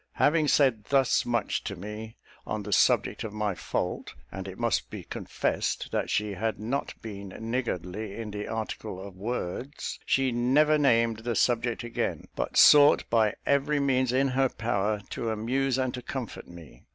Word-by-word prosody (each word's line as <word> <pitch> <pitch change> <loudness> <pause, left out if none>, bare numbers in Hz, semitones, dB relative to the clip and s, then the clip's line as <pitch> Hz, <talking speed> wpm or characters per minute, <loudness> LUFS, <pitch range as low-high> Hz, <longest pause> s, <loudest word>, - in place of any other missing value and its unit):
Having 155 0 +3
said 130 -7 +3
thus 135 -3 +2
much 120 -2 0
to 100 - -4
me 105 +4 -8 0.3
on 110 -1 -3
the 105 0 -3
subject - - +3
of 110 - -6
my 105 -2 -1
fault 90 - -3 0.2
(and 95 0 -6
it 95 - -8
must 120 -1 0
be - - -7
confessed - - -2
that - - -1
she 105 -1 0
had 110 0 -2
not 125 +7 -3
been 100 -3 -7
niggardly 110 -4 -3
in 110 -2 -6
the 105 0 -5
article 110 -3 -4
of 95 -1 -9
words), 120 +6 -4
she 135 -1 +2
never 140 +6 +3
named 115 -5 +3
the 120 +1 -3
subject 120 +1 +1
again, 120 - -3
but - - -2
sought 145 0 +7
by 110 -2 +3
every 140 +1 +2
means 130 -3 +2
in 135 +2 +2
her 130 +1 +2
power 105 -2 -1
to 115 - -3
amuse 125 +5 0
and 130 -1 0
to 125 - -5
comfort 125 -2 -6
me. 85 -3 -13
115 Hz, 170 wpm, -28 LUFS, 105-130 Hz, 0.3 s, sought